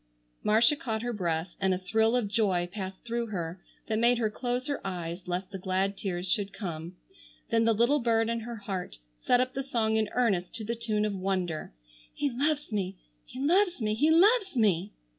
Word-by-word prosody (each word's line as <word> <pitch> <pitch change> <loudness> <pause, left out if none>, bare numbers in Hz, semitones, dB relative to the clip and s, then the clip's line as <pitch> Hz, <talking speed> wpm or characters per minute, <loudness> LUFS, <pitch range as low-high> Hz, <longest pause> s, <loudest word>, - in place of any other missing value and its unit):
Marcia 225 +7 +5
caught 230 -8 -3
her 240 0 -2
breath 170 -3 -2
and 190 -1 +2
a - - -2
thrill 220 +5 +2
of 245 -4 +1
joy 200 -5 +1
passed 190 0 -6
through 235 0 -2
her 175 -3 -4 0.3
that 220 -1 0
made 240 +1 +4
her 220 -2 0
close 245 +3 -2
her 285 -1 -2
eyes 175 -1 -5
lest 180 +2 -3
the 195 - -5
glad 190 +2 0
tears 185 -2 -3
should 205 -3 +1
come. 170 -3 -6 0.6
Then 225 0 +3
the 230 - +4
little 240 +7 +3
bird 225 -2 +2
in 230 0 -1
her 235 +1 -6
heart 195 - -5 0.2
set 245 - +3
up 255 0 0
the 270 - -2
song 225 -5 0
in 215 -1 +1
earnest 200 -8 +1
to 225 - -4
the 230 - -1
tune 220 -2 0
of 210 - -1
Wonder: 185 - -2 0.4
"He 285 -2 0
loves 290 +2 0
me, 195 -2 -2 0.3
He 255 - -9
loves 355 +5 +3
me, 215 -2 0
He 290 +9 +3
loves 390 - +4
me!" 200 -4 +2
220 Hz, 200 wpm, -29 LUFS, 190-240 Hz, 0.6 s, Marcia